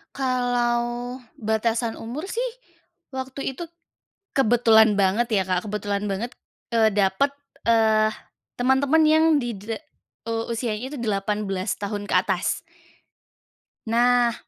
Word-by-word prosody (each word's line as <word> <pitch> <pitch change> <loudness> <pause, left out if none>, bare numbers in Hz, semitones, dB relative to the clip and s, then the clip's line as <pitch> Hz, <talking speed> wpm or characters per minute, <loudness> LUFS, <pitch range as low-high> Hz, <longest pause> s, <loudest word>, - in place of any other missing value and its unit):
Kalau, 245 -1 0 0.2
batasan 225 +1 0
umur 260 +11 -6
sih, 485 +4 -2 0.6
waktu 265 0 -4
itu 345 - -7 0.7
kebetulan 220 -4 +5
banget 215 +5 +2
ya 195 -3 +3
Kak, 185 +1 0
kebetulan 205 0 -2
banget, 230 +6 -4 0.4
eee, 220 -1 +4
dapet, 200 +7 +2 0.3
eee, 220 -1 +4 0.5
teman-teman 270 +5 +3
yang 315 +1 +5
dide 225 -2 -4 0.5
eee, 225 0 -1
usianya 230 +2 -3
itu 290 - -6
18 205 -2 -1
tahun 205 0 -3
ke - - +1
atas. - - -1 1.3
Nah, 240 0 +3
230 Hz, 110 wpm, -24 LUFS, 210-250 Hz, 1.3 s, kebetulan